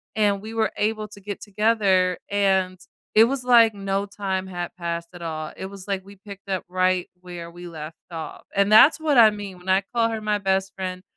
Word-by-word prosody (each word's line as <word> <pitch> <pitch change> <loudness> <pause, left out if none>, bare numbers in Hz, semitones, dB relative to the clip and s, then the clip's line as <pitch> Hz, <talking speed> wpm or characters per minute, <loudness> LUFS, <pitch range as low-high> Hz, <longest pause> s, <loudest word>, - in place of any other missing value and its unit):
and 205 -2 +2
we 220 +1 -8
were 220 -2 +1
able 215 0 -1
to 200 -1 -13
get 205 0 -6
together. 200 -3 +2
And 190 -2 +1 0.3
it 220 +1 +7
was 265 0 -2
like 230 -3 +6
no 195 0 -2
time 190 -2 -3
had 175 -1 -5
passed 170 -1 -4
at 175 - -11
all, 155 -2 -5
it 190 - -6
was, 195 0 -11
like, 195 -2 -2
we 200 0 -13
picked 200 0 -12
up 190 -1 -1
right 185 0 +1
where 175 -2 -8
we 175 +1 -10
left 155 -1 -8 0.2
off. 165 -1 -7
And 200 +1 +2
that's 270 +9 +7
what 300 -4 +1
I 220 -2 +9
mean 200 -3 -7
when 185 +1 -9
I 190 +1 +3
call 230 -1 +3
her 225 -1 -3
my 210 -1 0
best 190 0 0
friend. 185 -1 -5
195 Hz, 215 wpm, -23 LUFS, 185-210 Hz, 0.3 s, I